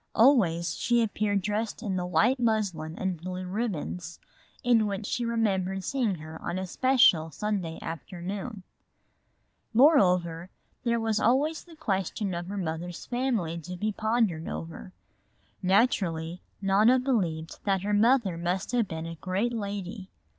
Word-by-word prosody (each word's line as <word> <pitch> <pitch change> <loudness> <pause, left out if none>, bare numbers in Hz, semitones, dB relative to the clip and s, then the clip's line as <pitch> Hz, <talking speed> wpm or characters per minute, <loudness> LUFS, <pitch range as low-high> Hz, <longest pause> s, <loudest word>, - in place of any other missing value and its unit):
Always 200 - +4
she 240 -1 +2
appeared 205 -2 0
dressed 210 +3 -2
in 200 -4 -1
the 180 -1 -2
white 220 +10 +3
muslin 200 -9 0
and 185 -4 -2
blue 185 +1 -5
ribbons, 180 -4 -3 0.5
in 235 -3 +4
which 200 +1 -3
she 240 +3 -1
remembered 195 -5 0
seeing 235 -2 0
her 155 0 -9
on 175 - -3
a 190 - -2
special 235 -6 +4
Sunday 180 -1 -3
afternoon. 190 +5 -6 1.1
Moreover, 180 - +4 0.3
there 235 -1 +1
was 220 -1 0
always 285 +8 +2
the 340 -2 -15
question 200 - -2
of 175 0 -4
her 200 +2 -5
mother's 175 -1 -4
family 235 -10 -1
to 180 +3 -7
be 215 +4 -1
pondered 215 -6 0
over. 165 +3 -6 0.7
Naturally 185 -4 +1 0.2
Nona 210 +6 +5
believed 180 -12 -1
that 195 -2 +1
her 210 +1 0
mother 215 -5 +3
must 180 +4 -1
have 240 -4 +1
been 160 -1 -5
a 165 - -5
great 195 +6 -1
lady. 200 -2 -5
195 Hz, 140 wpm, -28 LUFS, 175-230 Hz, 1.1 s, Nona